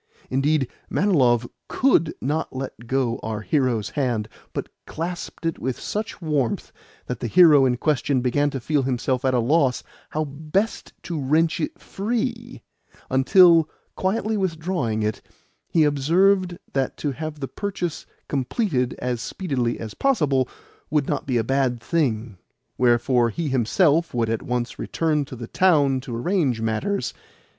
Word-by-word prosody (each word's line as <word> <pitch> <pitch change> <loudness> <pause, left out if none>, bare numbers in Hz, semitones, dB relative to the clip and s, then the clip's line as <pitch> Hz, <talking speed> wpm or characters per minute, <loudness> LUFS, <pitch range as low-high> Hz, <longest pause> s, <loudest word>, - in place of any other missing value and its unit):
Indeed, 135 +1 +2 0.2
Manilov 125 - +3 0.2
COULD 210 - +2
not 150 +1 -2
let 130 -3 -6
go 125 -2 0
our 110 -1 -4
hero's 125 -5 0
hand, 120 -7 -1 0.2
but - - -4 0.2
clasped 170 +1 -5
it 165 - -1
with 130 0 -3
such 215 +1 -4
warmth 150 - -1 0.3
that 125 -2 -4
the 120 - -2
hero 150 0 +7
in 125 -1 +1
question 135 -1 +1
began 145 +4 +1
to 135 - -4
feel 145 +3 +1
himself 130 0 -1
at 130 -1 +2
a - - +3
loss 130 +1 +2 0.3
how 155 - -1
best 155 +9 -2
to 165 -4 -3
wrench 160 +5 +2
it 155 - -3
free: 235 +3 -3 0.5
until, 165 +4 +6 0.3
quietly 215 +3 0
withdrawing 160 - -1
it, 105 0 -2 0.5
he 165 - +3
observed 175 +6 +3 0.2
that 135 -1 -1
to 145 - -2
have 155 +2 -6
the 135 - -3
purchase 180 -3 -4 0.2
completed 135 - -1
as 125 -2 -2
speedily 130 -10 -2
as 110 -2 -6
possible 145 - +1 0.4
would 150 -2 +1
not 145 - -2
be 125 -3 +1
a 115 - +1
bad 130 0 +1
thing; 115 - -1 0.4
wherefore 120 0 +3
he 160 +5 -3
himself 145 - +2
would 115 -2 +1
at 115 - -1
once 125 0 -3
return 155 -3 0
to 130 - -9
the 115 -1 -6
town 145 -3 +3
to 125 -2 -6
arrange 135 - 0
matters. 115 - -1
140 Hz, 150 wpm, -23 LUFS, 125-165 Hz, 0.5 s, hero